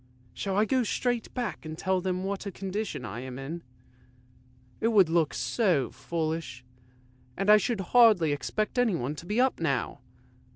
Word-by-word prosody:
Shall 195 -1 -2
I 210 - +4
go 255 +3 +2
straight 245 0 -1
back 245 -3 -3
and 155 0 -7
tell 185 +1 0
them 185 0 -2
what 200 +1 -3
a - - -3
condition 190 - -4
I 105 +2 -6
am 130 0 -7
in? 150 +6 -6 1.2
It 225 - +1
would 200 -7 +5
look 165 -2 +1
so 175 - +1
foolish, 160 -7 -4 0.7
and 195 +2 +3
I 215 - +9
should 210 +1 -1
hardly 215 -10 +6
expect 215 - -2
anyone 170 - +1
to 165 +3 -10
be 210 +4 0
up 260 +1 +2
now! - - -1
190 Hz, 165 wpm, -28 LUFS, 155-215 Hz, 1.2 s, I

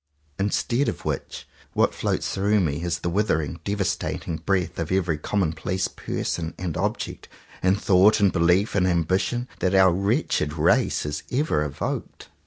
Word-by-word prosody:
Instead 120 +7 +1
of - - -7
which, - - -4 0.3
what - - +2
floats - - -1
through 105 +2 +2
me 80 -4 0
is 85 -1 -2
the 85 - -1
withering, 85 -6 0
devastating 100 -4 -2
breath 90 0 -1
of 80 0 -3
every 90 -4 +1
commonplace 90 +1 -1
person, 80 -1 -4
and 90 -4 -4
object, - - -3 0.3
and 95 +2 +2
thought, 100 +3 +5
and 100 -2 +3
belief, 90 +4 +3
and 95 -2 +2
ambi 85 +1 +2
tion, 120 +3 -2
that 95 +1 +1
our 95 -2 +6
wretched 90 -5 0
race 80 - +2
has 75 0 -3
ever 125 - +1
evoked. 75 -1 -5
90 Hz, 155 wpm, -24 LUFS, 80-100 Hz, 0.3 s, our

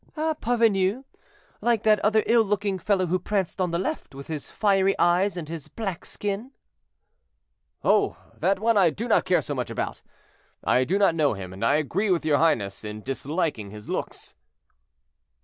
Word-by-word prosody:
"A 315 +1 +1
parvenu, 225 -3 +1 0.6
like 235 -3 +1
that 215 -1 +4
other 215 +1 +3
ill 235 0 +5
looking 200 -2 -1
fellow 190 0 +1
who 180 +2 0
pranced 195 0 -2
on 180 - +1
the 170 - -1
left, 170 -6 -4
with 140 0 -8
his 155 -3 -6
fiery 195 -2 +2
eyes 180 +3 +2
and 165 -3 -5
his 160 -2 -7
black 195 -6 -5
skin." 210 +6 -4 1.3
"Oh! - - +3 0.2
that 195 +1 +2
one 225 +1 +2
I 185 -4 +5
do 215 +10 -5
not 230 - +3
care 185 -1 +2
so 145 - -3
much 125 -3 -3
about; - - -4 0.6
I 130 +1 +3
do 185 +8 +1
not 200 -4 +4
know 155 -5 +2
him, 95 -1 -7
and 95 - -7
I 130 +5 +4
agree 170 +8 0
with 175 -4 +1
your 150 -2 +3
highness 110 -13 +1
in 105 0 -7
disliking 135 - -2
his 105 +1 -11
looks." - - -4
185 Hz, 180 wpm, -25 LUFS, 150-210 Hz, 1.3 s, ill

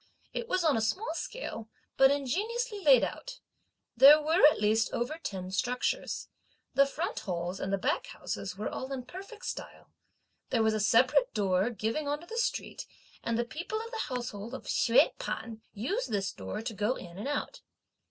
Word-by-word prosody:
It 470 - -3
was 370 -4 +1
on 315 -4 +4
a 225 - +1
small 320 - -1
scale, 330 - -5 0.3
but 270 0 +7
ingeniously 415 - -1
laid 280 -9 +6
out. - - -5 0.6
There 275 +5 +9
were, 320 +5 +2
at 300 - +2
least, 215 +2 +2
over 275 +7 -2
ten 185 - -5
structures. 250 +6 -1 0.5
The 275 0 +5
front 315 +5 -3
halls 180 0 -3
and 190 - -3
the 195 - +2
back - - -1
houses 190 -1 -5
were 210 - -3
all 260 +1 -5
in 260 -2 -3
perfect 395 - -10
style. - - -7 0.6
There 225 - +2
was 220 0 +3
a 215 - 0
separate 220 - +4
door 195 0 +2
giving 230 +6 -2
on 290 +1 -1
to - - -11
the 460 +6 -4
street, - - -2 0.4
and 230 -1 0
the 240 - 0
people 345 - -4
of 455 +1 -7
the 450 - -3
household 240 -2 -4
of - - -8
Hsüeh 235 0 +4
P'an 220 +1 -5
used 280 - -2
this 195 -3 -1
door 95 - -5
to 230 0 -4
go 210 +5 0
in 175 0 -10
and 215 - -4
out. 290 +12 -3
250 Hz, 185 wpm, -30 LUFS, 210-335 Hz, 0.6 s, There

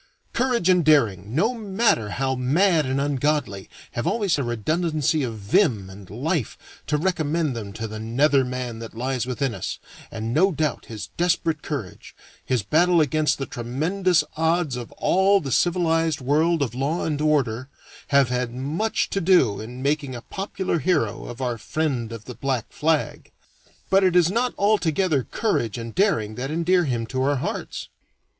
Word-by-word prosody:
Courage 245 -6 +1
and 180 -2 +4
daring, 115 - +2
no 220 - +2
matter 205 - +1
how 130 +4 -1
mad 155 +5 +2
and 130 +1 0
ungodly, 140 -7 -1 0.2
have 120 - -3
always 200 -9 +1
a - - 0
redundancy 155 - 0
of 115 -4 -3
vim 105 - +1
and 95 -1 -12
life 135 - -2 0.3
to 150 - +1
recommend 160 -4 0
them 105 -3 -6
to 110 +1 -5
the 110 0 -7
nether 135 +5 +2
man 125 -2 -4
that 115 -1 -9
lies 125 +1 -2
within 130 0 -1
us, - - -4 0.3
and 110 +1 -4
no 190 +7 +4
doubt 155 -1 -2
his 105 -3 -7
desperate 165 -3 +1
courage, 130 - -6 0.3
his 125 -5 0
battle 170 - +3
against 150 -1 +2
the 135 - -3
tremendous 160 +11 0
odds 160 -3 +1
of 120 -2 -7
all 195 +2 +3
the 140 -7 -5
civilized 165 -1 +2
world 150 +4 +2
of 120 -5 -3
law 140 +7 -1
and 150 -2 -1
order, 135 -5 +1 0.4
have 140 -2 +4
had 125 -1 -1
much 155 +12 -1
to 195 - 0
do 160 - +4
in 125 +4 -8
making 140 -2 -1
a 120 - -7
popular 190 -3 -3
hero 135 - 0
of 120 +2 -8
our 120 -3 -2
friend 130 -5 -2
of 115 -2 -8
the 125 - -7
black 130 -3 -2
flag. 155 0 -1 0.6
But 195 +1 +5
it 185 -2 +3
is 175 -1 +5
not 240 +4 0
altogether 185 -7 +2
courage 120 - -1
and 115 -1 -6
daring 115 - +1
that 135 - -3
endear 170 +3 +2
him 120 -4 -1
to 130 +3 -3
our 140 +2 +2
hearts. 130 - -4
145 Hz, 170 wpm, -23 LUFS, 120-170 Hz, 0.6 s, But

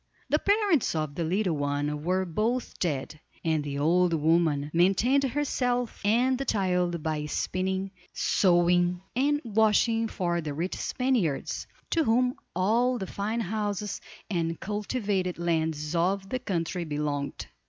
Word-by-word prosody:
The 300 - +3
parents 400 - +2
of 155 -2 -2
the 170 - -2
little 180 +1 0
one 145 +1 -1
were 185 +2 +1
both 220 +9 -2
dead, 155 -2 -2 0.3
and 160 -2 +1
the 140 -1 -4
old 170 +4 +3
woman 155 -2 +2
maintained 195 +11 +3
herself 250 -3 -1
and 245 +5 +3
the - - 0
child 180 - 0
by 155 -2 -2
spinning, 190 +4 -2 0.2
sewing, 175 -1 +3
and 290 +3 +2
washing 225 +1 +3
for 175 -5 -1
the 150 -2 -4
rich 175 +5 -2
Spaniards, 245 - -1 0.2
to 330 - +3
whom 250 +2 +3 0.2
all 235 +7 +2
the 195 - -4
fine 215 +5 -2
houses 210 0 -2 0.3
and 165 -4 -1
cultivated 205 -3 -2
lands 160 -2 -1
of 190 +3 0
the 255 - -1
country 180 -5 -2
belonged. 145 -2 -3
185 Hz, 135 wpm, -28 LUFS, 165-225 Hz, 0.3 s, The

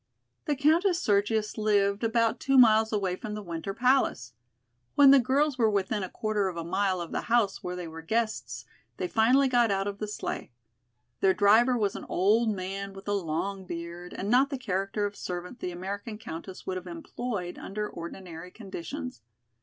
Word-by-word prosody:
The 295 -3 +1
Countess 335 +6 +3
Sergius 210 - +1
lived 205 -1 +2
about 230 0 +2
two 270 0 +2
miles 220 -3 +6
away 195 -4 0
from 210 +3 -6
the 210 - -6
Winter 170 +1 -4
Palace. 240 - +1 0.6
When 280 -1 +8
the 275 - +8
girls 270 +2 +1
were 225 -2 +4
within 200 0 0
a 185 - -4
quarter 215 -2 -1
of 180 -2 -5
a 165 - -3
mile 190 +2 0
of 170 -1 -6
the - - -1
house 230 -4 +2
where 180 0 -4
they 180 -1 -5
were 165 0 -8
guests, 160 - -2 0.3
they 180 - -2
finally 250 +7 +4
got 240 -3 +3
out 195 -1 0
of 200 0 -4
the 215 - -3
sleigh. 210 - -5 0.7
Their 190 -1 +3
driver 225 +5 +5
was 205 -3 0
an - - -7
old 215 +5 +3
man 195 0 -4
with 195 +1 -12
a 205 - +1
long 190 +1 -2
beard 170 +1 -7
and 195 - -3
not 255 +5 +4
the 275 - -3
character 195 -2 -1
of 205 0 -4
servant 180 +7 -6
the - - -3
American 200 +5 -5
Countess 185 -2 -8
would 185 -1 -2
have 185 0 -8
employed 180 +2 -5
under 210 +1 -4
ordinary 170 0 -8
conditions. 165 - -7
200 Hz, 185 wpm, -28 LUFS, 180-225 Hz, 0.7 s, When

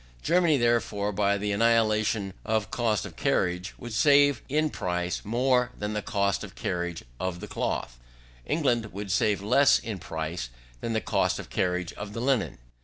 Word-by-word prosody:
Germany, 170 -4 +3
therefore, 115 -4 +1
by 100 0 +1
the 105 +1 -2
annihilation 110 -2 +2
of 110 -2 -1
cost 115 -4 0
of - - -9
carriage, 90 +3 0
would 120 -2 -8
save 145 +1 +5
in 155 +2 +1
price 90 0 -2
more 125 +2 +2
than 105 +1 -3
the 105 - -1
cost 100 -2 0
of 100 -1 -9
carriage 85 -2 -3 0.2
of 95 -2 -3
the - - -6
cloth; - - -3 0.4
England 120 - 0
would 100 0 -5
save 105 0 +1
less 140 +7 +5
in 105 -4 -5
price 80 -4 -4 0.3
than 115 - -3
the 110 - 0
cost - - +1
of - - -9
carriage 90 -1 -1
of 100 0 -7
the 115 - -4
linen. 125 -3 0
105 Hz, 170 wpm, -27 LUFS, 95-120 Hz, 0.4 s, save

